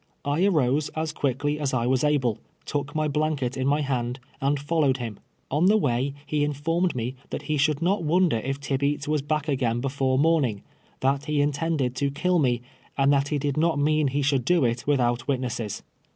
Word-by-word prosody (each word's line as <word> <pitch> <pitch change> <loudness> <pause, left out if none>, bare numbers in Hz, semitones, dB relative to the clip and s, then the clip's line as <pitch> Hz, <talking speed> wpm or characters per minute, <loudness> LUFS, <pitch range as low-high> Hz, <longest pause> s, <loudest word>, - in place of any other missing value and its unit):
I 145 +5 +1
arose 150 -5 +2
as 160 0 -1
quickly 145 +1 -1
as 140 -3 -1
I 120 -1 0
was 130 +2 +1
able, 135 -7 +1 0.3
took 145 0 -3
my 155 0 +1
blanket 145 -4 -1
in 130 0 -1
my 145 +2 +2
hand, 125 -2 -2 0.2
and 140 +1 +1
followed 145 -2 +1
him. 115 -5 -6 0.3
On 155 +6 +3
the 215 +2 +5
way 135 - 0
he 150 -1 0
in 145 0 0
formed 165 +4 0
me 120 +1 -2 0.2
that - - -5
he 155 - -1
should 150 +2 +1
not 190 +2 +2
wonder 170 -3 +2
if 135 +5 -3
Tibeats 140 +1 -1
was 150 -1 +1
back 150 +1 -2
again 125 -5 0
before 135 0 0
morning 140 -9 +2 0.2
— - - -34
that 135 +2 +1
he 150 -1 0
intended 145 -2 0
to 140 0 +1
kill 175 +5 +1
me 125 -4 +1 0.2
— - - -31
and 140 +1 +4
that 140 0 +2
he 150 - -1
did 145 0 -2
not 165 -1 +2
mean 150 +1 +2
he 140 +2 0
should 135 -2 +2
do 170 +1 +3
it 120 +2 -1
with 145 -2 +3
out 120 -1 0
witnesses. 125 -6 -2
140 Hz, 210 wpm, -25 LUFS, 130-150 Hz, 0.3 s, the